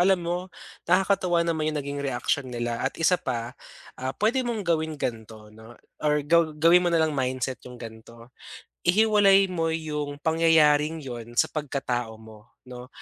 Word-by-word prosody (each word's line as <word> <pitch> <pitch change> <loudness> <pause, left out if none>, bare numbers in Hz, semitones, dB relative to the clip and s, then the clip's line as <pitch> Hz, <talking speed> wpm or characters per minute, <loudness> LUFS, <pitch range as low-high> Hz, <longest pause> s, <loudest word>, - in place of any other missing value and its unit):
alam 185 -1 +3
mo, 175 +2 -3 0.4
nakakatuwa 185 -2 +2
naman 160 -2 -1
yung 155 - -2
naging 140 +1 -5
reaksyon 135 0 -1
nila 120 -1 -3
at 135 - -2
isa 175 +2 +2
pa, 120 -2 -4 0.5
ah, 130 +1 -3
puwede 230 +5 +1
mong 225 -4 -2
gawin 160 -2 0
ganito 110 -4 -6
'no, 110 +2 -14 0.3
or 150 -1 +1
gaw 170 +1 +4
gawin 170 +3 +5
mo - - +4
na 165 -2 +2
lang 155 -1 0
mindset 130 -1 -2
yung 125 - -11
ganito. 115 +1 -12 0.6
Ihiwalay 200 -1 +4
mo 165 -3 -1
yung 150 -3 -3
pangyayaring 160 -1 +3
'yon 120 -2 -8
sa - - +3
pagkatao 130 -6 -3
mo, 110 0 -16 0.2
'no. 125 0 -10
150 Hz, 160 wpm, -25 LUFS, 120-170 Hz, 0.6 s, gawin